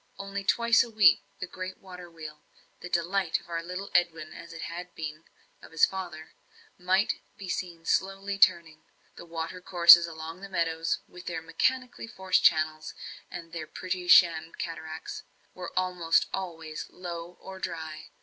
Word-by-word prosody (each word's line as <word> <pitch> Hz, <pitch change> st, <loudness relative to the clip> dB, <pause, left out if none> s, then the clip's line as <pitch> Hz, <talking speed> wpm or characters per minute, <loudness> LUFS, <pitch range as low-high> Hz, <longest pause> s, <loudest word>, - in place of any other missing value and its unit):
Only 195 Hz, 0 st, -5 dB
twice 235 Hz, +3 st, +4 dB
a 235 Hz, -, -8 dB
week 215 Hz, -6 st, +6 dB, 0.2 s
the -, -, -3 dB
great 185 Hz, +1 st, -7 dB
water 180 Hz, -2 st, -11 dB
wheel, 155 Hz, -2 st, -10 dB, 0.4 s
the 180 Hz, -, -8 dB
delight 175 Hz, +1 st, 0 dB
of -, -, -20 dB
our 165 Hz, 0 st, -2 dB
little 180 Hz, +3 st, -6 dB
Edwin 165 Hz, -3 st, +1 dB
as 170 Hz, 0 st, -11 dB
it 165 Hz, -, -7 dB
had 175 Hz, +1 st, -6 dB
once 180 Hz, -, -36 dB
been 155 Hz, 0 st, -6 dB, 0.4 s
of -, -, -14 dB
his 165 Hz, -, +5 dB
father, 170 Hz, -5 st, -7 dB, 0.4 s
might 185 Hz, +3 st, +1 dB, 0.2 s
be 195 Hz, -, -8 dB
seen 175 Hz, -2 st, -4 dB
slowly 195 Hz, +1 st, 0 dB
turning; 165 Hz, -4 st, +4 dB
and -, -, -37 dB, 0.3 s
the 170 Hz, -, -10 dB
water 165 Hz, +2 st, -5 dB
courses 170 Hz, -1 st, +8 dB
along 165 Hz, +2 st, -8 dB
the 200 Hz, -, -8 dB
meadows, 165 Hz, -2 st, -1 dB
with 180 Hz, 0 st, -13 dB
their 170 Hz, -1 st, -4 dB
mechanically 245 Hz, +10 st, -1 dB
forced 190 Hz, -4 st, +1 dB
channels, 155 Hz, -1 st, +2 dB, 0.3 s
and 170 Hz, -2 st, -9 dB
their 160 Hz, -2 st, -5 dB
pretty 180 Hz, +1 st, -4 dB
sham 165 Hz, -2 st, +6 dB
cataracts, 160 Hz, -1 st, -6 dB, 0.3 s
were 180 Hz, -1 st, -7 dB
almost 180 Hz, -3 st, +2 dB
always 165 Hz, -4 st, -5 dB
low 175 Hz, -1 st, -7 dB
or 190 Hz, 0 st, -10 dB
dry. 160 Hz, -3 st, -6 dB
175 Hz, 165 wpm, -28 LUFS, 165-185 Hz, 0.4 s, courses